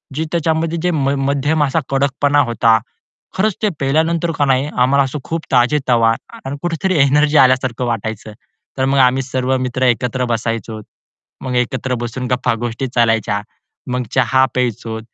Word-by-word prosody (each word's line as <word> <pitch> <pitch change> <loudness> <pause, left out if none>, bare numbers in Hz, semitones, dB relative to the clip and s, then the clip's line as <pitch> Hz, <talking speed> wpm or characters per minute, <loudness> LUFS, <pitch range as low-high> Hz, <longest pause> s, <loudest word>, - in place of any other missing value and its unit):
जी 160 - -1
त्याच्यामध्ये 165 0 0
जे 180 - +1
म 140 -4 0 0.2
मध्यम 145 +2 +1
असा 145 +3 +1
कडकपणा 140 +1 +1
होता. 115 0 +3 0.6
खरंच 210 +1 +2
ते 210 - +3
पिल्यानंतर 160 +4 +1
का 145 - +2
नाही 135 +1 +1
आम्हाला 135 +2 +4
असं 135 +3 -4
खूप 165 0 -3
ताजेतवा 125 -3 +3 0.3
आणि 140 +2 -4
कुठेतरी 175 +1 -1
एनर्जी 150 +2 +3
आल्यासारखं 130 -1 +3
वाटायचं. 110 -2 -4 0.4
तर 130 - +1
मग 135 +1 +1
आम्ही 130 +1 +2
सर्व 130 0 -1
मित्र 130 0 -2
एकत्र 125 +1 0
बसायचो. 115 -2 -3 0.6
मग 125 -1 -3
एकत्र 125 +1 -1
बसून 120 +2 -4
गप्पा-गोष्टी 120 +1 -1
चालायच्या, 115 -3 +1 0.5
मग 125 0 -1
चहा 130 +1 +3
प्यायचो, 115 -2 -2
130 Hz, 145 wpm, -17 LUFS, 120-145 Hz, 0.6 s, आम्हाला